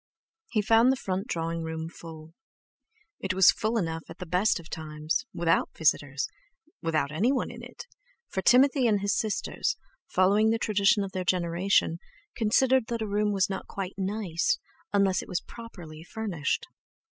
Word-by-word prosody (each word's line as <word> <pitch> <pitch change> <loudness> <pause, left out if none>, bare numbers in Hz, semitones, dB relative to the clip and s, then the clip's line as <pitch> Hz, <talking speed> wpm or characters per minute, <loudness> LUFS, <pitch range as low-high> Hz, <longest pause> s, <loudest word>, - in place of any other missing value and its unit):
He 215 - +1
found 225 +4 +5
the - - +2
front 190 -5 -3
drawing 165 0 -2
room 160 0 -4
full. 160 -1 -11 0.9
It 185 -1 -2
was 190 -5 +7
full 220 +2 -1
enough 165 -5 -2
at - - -9
the 180 - -6
best 180 +4 +2
of 165 - -12
times—without 160 +5 -1
visitors—without 160 - -2
any 205 +12 +2
one 270 - -1
in - - -10
it—for - - -9
Timothy 260 +3 +5
and 205 -3 +2
his 200 -1 +1
sisters, 220 - -1 0.3
following 200 +4 +3
the 225 - +2
tradition 210 0 +3
of 195 - -5
their 185 -1 -3
generation, 175 -1 +1 0.4
considered 245 +2 +3
that 230 -2 -2
a - - -3
room 210 +1 +1
was 195 -2 +2
not 190 -1 -5
quite 195 -1 -5
"nice" 195 - 0 0.3
unless 195 -2 +2
it - - -12
was 180 - -1
"properly" 175 -9 -11
furnished. 175 -7 -2
195 Hz, 155 wpm, -28 LUFS, 165-225 Hz, 0.9 s, was